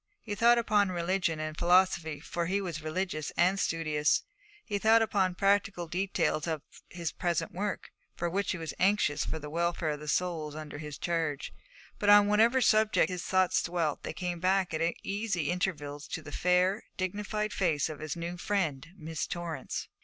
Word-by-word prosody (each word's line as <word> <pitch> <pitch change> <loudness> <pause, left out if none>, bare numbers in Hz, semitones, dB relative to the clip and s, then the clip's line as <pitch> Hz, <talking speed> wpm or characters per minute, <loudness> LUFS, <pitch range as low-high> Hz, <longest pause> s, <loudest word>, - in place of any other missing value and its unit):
He 210 - -4
thought 235 +3 +5
upon 210 -4 +3
religion 175 -2 0
and 155 0 -4
philosophy, 175 -3 +3
for 170 -1 -3
he 195 +2 +1
was 170 -6 -4
religious 155 -1 -3
and 185 +3 +3
studious; 155 -4 +1 0.4
he 205 -2 -2
thought 225 +2 +5
upon 190 -4 +1
practical 195 -2 +1
details 175 -3 0
of 160 -3 -2 0.3
his 170 -3 -4
present 170 -2 -1
work, 200 +2 -4 0.2
for 175 +1 -3
he 190 -1 -2
was 165 -1 -5
anxious 185 -6 +2
for - - -3
the 150 -1 -7
welfare 170 -1 0
of 150 - -4
the 150 - -9
souls 155 -2 -1
under 150 -1 -7
his 150 -1 -7
charge; 165 -4 -2 0.5
but 205 - +1
on 205 0 +8
whatever 225 +5 +4
subject 215 -2 +3
his 180 -1 -3
thoughts 185 -1 +2
dwelt, 170 -4 -1
they - - -5
came 175 +1 -4
back 185 0 +1
at 160 - -1 0.2
easy 195 -6 -1
intervals 150 -5 -3
to 160 - -5
the 145 - -9
fair, 180 +5 +2 0.2
dignified 210 +3 -2
face 160 -7 +1
of 155 -2 -7
his 155 -1 -4
new 170 +1 -5
friend, 165 -8 -1
Miss 160 -2 -4
Torrance. 170 -6 -4
175 Hz, 175 wpm, -30 LUFS, 155-195 Hz, 0.5 s, on